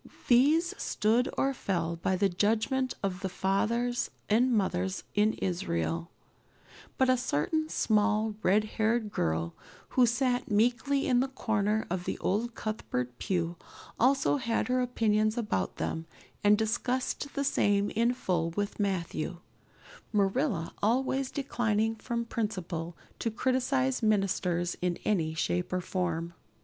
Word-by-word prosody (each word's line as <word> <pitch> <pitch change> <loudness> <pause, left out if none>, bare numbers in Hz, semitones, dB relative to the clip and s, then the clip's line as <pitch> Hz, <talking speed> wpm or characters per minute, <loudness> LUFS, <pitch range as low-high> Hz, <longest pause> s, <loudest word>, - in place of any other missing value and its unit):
These 300 +8 +4
stood 230 +4 +2
or 275 0 +2
fell 170 -8 -1
by 185 +3 0
the 200 +2 +3
judgment 225 +7 +1
of 185 -2 -1
the 190 -1 -3
fathers 230 +7 0 0.2
and 245 +4 +4
mothers 190 -3 0
in 210 +1 +3
Israel; 170 - -2 0.9
but 260 - +3
a 255 - +5
certain 260 - 0
small, 215 -2 +2
red 205 +3 +3
haired 220 0 0
girl 80 - -1 0.4
who 250 -2 +4
sat 245 +1 0
meekly 245 +6 +2
in 250 -2 +3
the 265 - +2
corner 220 -4 0
of 180 -1 -2
the - - -2
old 225 +5 -1
Cuthbert 125 - -3
pew 175 -2 -1 0.4
also 270 +4 +3
had 235 -2 -1
her 255 0 +2
opinions 215 -2 +1
about 150 - -1
them 160 0 -3 0.4
and 205 0 +6
discussed 250 +5 -1
the 280 - 0
same 205 -6 +2
in 235 +2 +2
full 170 -8 0
with 205 +5 -3
Matthew, 180 -3 -2 0.7
Marilla 200 - 0
always 260 +4 +1
declining 225 -5 0
from 235 +1 -3
principle 180 -7 -3 0.2
to 230 - 0
criticize 260 +3 0
ministers 190 -5 +1
in 180 -1 0
any 160 -7 +1
shape 180 +2 -1
or 185 - 0
form. 175 -2 -2
215 Hz, 135 wpm, -29 LUFS, 185-245 Hz, 0.9 s, and